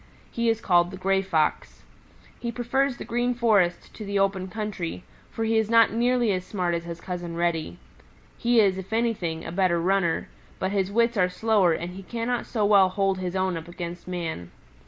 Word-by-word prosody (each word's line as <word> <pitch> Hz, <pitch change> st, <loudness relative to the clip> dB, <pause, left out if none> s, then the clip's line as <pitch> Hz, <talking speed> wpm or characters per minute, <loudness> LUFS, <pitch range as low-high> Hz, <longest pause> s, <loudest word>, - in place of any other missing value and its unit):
He 235 Hz, 0 st, 0 dB
is 225 Hz, 0 st, 0 dB
called 175 Hz, -2 st, +3 dB
the 190 Hz, -, -8 dB
Gray 195 Hz, +1 st, +1 dB
Fox. 165 Hz, -6 st, -1 dB, 0.6 s
He 235 Hz, -, -3 dB
prefers 250 Hz, +2 st, 0 dB
the -, -, -7 dB
Green 245 Hz, +1 st, 0 dB
Forest 210 Hz, -7 st, +2 dB
to 215 Hz, -, -8 dB
the 200 Hz, 0 st, -2 dB
open 195 Hz, -1 st, +1 dB
country, 195 Hz, -4 st, -5 dB, 0.3 s
for 225 Hz, -, -4 dB
he 225 Hz, 0 st, +2 dB
is 220 Hz, -1 st, -1 dB
not 230 Hz, -1 st, +5 dB
nearly 240 Hz, -1 st, +2 dB
as 185 Hz, -2 st, -1 dB
smart 180 Hz, -2 st, -2 dB
as 170 Hz, 0 st, -3 dB
his 170 Hz, 0 st, -6 dB
Cousin 175 Hz, -2 st, -5 dB
Reddy. 165 Hz, -, -1 dB, 0.6 s
He 240 Hz, 0 st, +2 dB
is, 195 Hz, -3 st, +3 dB
if 190 Hz, +3 st, -8 dB
anything, 205 Hz, -9 st, -1 dB
a 165 Hz, -, -5 dB
better 180 Hz, -1 st, +2 dB
runner, 180 Hz, -1 st, +1 dB, 0.3 s
but 190 Hz, -, -2 dB
his 195 Hz, -1 st, 0 dB
wits 235 Hz, +1 st, +2 dB
are 180 Hz, -1 st, +3 dB
slower 200 Hz, -3 st, +2 dB
and 170 Hz, +2 st, -4 dB
he 190 Hz, +2 st, -9 dB
cannot 235 Hz, +4 st, -3 dB
so 215 Hz, -4 st, 0 dB
well 200 Hz, -2 st, +5 dB
hold 195 Hz, 0 st, 0 dB
his 180 Hz, 0 st, -4 dB
own 185 Hz, -1 st, 0 dB
against 175 Hz, +1 st, -7 dB
man. 165 Hz, -, -4 dB
195 Hz, 195 wpm, -25 LUFS, 175-225 Hz, 0.6 s, not